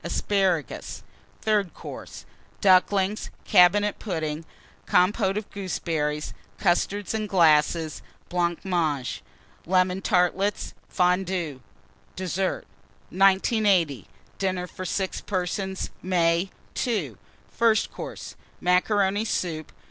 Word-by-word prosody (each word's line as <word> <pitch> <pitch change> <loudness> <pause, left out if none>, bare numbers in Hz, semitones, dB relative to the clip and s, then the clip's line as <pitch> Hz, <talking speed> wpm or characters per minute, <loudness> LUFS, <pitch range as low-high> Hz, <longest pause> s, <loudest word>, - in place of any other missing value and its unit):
Asparagus. 190 - -1 0.4
THIRD 210 -4 +1
COURSE. - - -9 0.3
Ducklings. 195 +1 +3 0.2
Cabinet 205 +2 +5
Pudding. 160 -5 -3 0.4
Compôte 195 +2 +3
of 210 -1 -4
Gooseberries. 160 -6 -2 0.2
Custards 195 +3 0
in 215 -1 -2
Glasses. 160 -3 +3 0.3
Blancmange. 170 -5 -1 0.5
Lemon 185 +1 +2
Tartlets. 185 +2 +1 0.2
Fondue. 180 -5 0 0.5
DESSERT. 185 +1 -2 0.5
1980. 190 - +3 0.3
DINNER 185 -2 -1
FOR 185 +1 -8
6 190 +1 -2
PERSONS 190 0 -3
(May). 175 0 +2 0.4
II. 180 - -1 0.4
FIRST 225 -2 +2
COURSE. - - -8 0.2
Macaroni 195 +3 +2
Soup. 165 -7 -3
185 Hz, 85 wpm, -25 LUFS, 170-195 Hz, 0.5 s, Cabinet